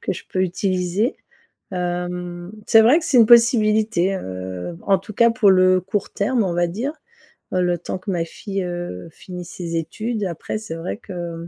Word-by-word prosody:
que - - -2
je 180 - -8
peux 185 - -2
utiliser. 185 +4 0 0.6
Hem, 175 0 -4 0.2
c'est 225 - +7
vrai 255 +9 +6
que 325 - -6
c'est 290 -7 +2
une 225 - +7
possibilité, 220 -5 +4
heu, 95 - -6
en 195 -1 +3
tout 215 +3 -10
cas 235 +1 +5
pour 230 -4 +4
le 185 0 +5
court 200 +2 -3
terme 225 +3 0
on 180 - -1
va 175 0 +2
dire, 240 - -3 0.6
heu, 185 - +2
le 175 -1 +1
temps 180 - -4
que 195 +1 -4
ma 170 -2 0
fille, 195 +3 -5
heu, 175 - -5
finisse 180 +1 -9
ses 170 -2 -4
études 215 +7 -3
et - - 0
après 170 +4 -4
c'est 200 -7 -7
vrai 165 +5 -5
que 170 -5 -7
185 Hz, 195 wpm, -21 LUFS, 175-215 Hz, 0.6 s, c'est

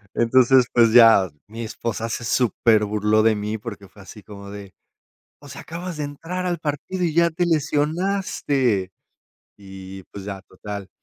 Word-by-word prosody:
Entonces, 125 +2 +4
pues, 115 -2 +5
ya 115 -5 +7 0.2
mi 115 +3 -7
esposa 115 0 -4
se 115 - -4
superburló 110 -3 +2
de 110 0 +3
mí, 105 +1 -3
porque 100 -3 -9
fue 100 - -17
así 105 +2 -13
como 100 -1 -11
de: 100 -1 -10 0.7
"O - - -14
sea, - - -9
acabas 170 +1 -7
de 150 - -3
entrar 165 +6 -5
al 175 -1 -1
partido 155 +4 -3
y 165 -3 -1
ya 170 0 +4
te 175 +2 -1
lesionaste". 150 - 0 0.7
Y 95 -1 -11
pues, 100 -1 -8
ya 100 -1 -6
total, 100 0 -8
115 Hz, 160 wpm, -22 LUFS, 100-150 Hz, 0.7 s, ya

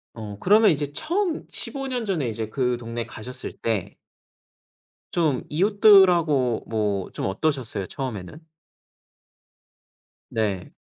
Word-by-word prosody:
어 105 -3 -7
그러면 210 +3 +5
인제 145 -2 -1
처음 340 - -1
15 270 -1 -5
년 250 -3 -2
전에 170 - -1
이제 110 -1 -3
그 125 0 0
동네 115 0 -5
가셨을 125 +2 -7
때 110 -6 -3 1.2
좀 155 -7 +1
이웃들하고 175 - +4
뭐 105 -4 -1
좀 - - -2
어떠셨어요? 110 -3 -1
처음에는? 130 - -6 1.9
네. 100 -5 -2
130 Hz, 210 characters per minute, -24 LUFS, 110-185 Hz, 1.9 s, 그러면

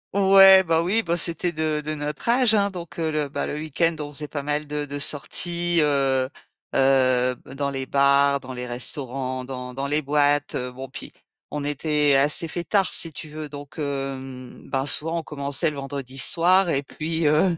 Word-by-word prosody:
O 195 -1 +3
ouais, 190 -1 +9
ben, 165 -1 +1
oui, 200 +6 +1
bah, 170 -4 -1
c'était 170 +1 -1
de 155 -1 -2
de 155 +1 -4
notre 150 +7 -5
âge 240 -2 +4
hein. 200 -1 +3
Donc, 170 -3 -9
heu, 160 -1 -1
le, 150 -2 -2
bah, - - -3
le - - -4
week-end, 160 +2 0
on 145 0 -6
faisait 150 +1 -5
pas 145 -1 -5
mal 150 +1 -2
de 150 0 -3
de 145 0 -6
sorties, 170 +4 0
heu 135 -3 +1 0.5
heu 130 -2 +3
b 130 - -14
dans 140 0 -2
les 135 -1 -5
bars, 140 0 +3
dans 130 -1 -9
les 125 0 -6
restaurants, 130 +1 -3
dans 125 -1 -7
dans 135 +2 -3
les 150 +1 0
boîtes. 145 0 +1
Heu, 125 0 -3
bon, 130 +2 -8
puis - - -8 0.4
on 150 -1 -4
était 145 0 +1
assez 145 +4 +3
fêtards, 180 +4 0
si 165 - +3
tu 155 - -8
veux. 150 0 -7
Donc, 145 +1 -10
hem, 135 -3 -6
bah, 135 0 -1
souvent, 165 +3 0
on - - -7
commençait 145 +2 0
le 145 - -9
vendredi 135 -1 -5
soir 175 +5 +4
et 140 -2 0
puis, 160 +3 -3
heu 155 +4 +3
145 Hz, 200 wpm, -23 LUFS, 135-165 Hz, 0.5 s, ouais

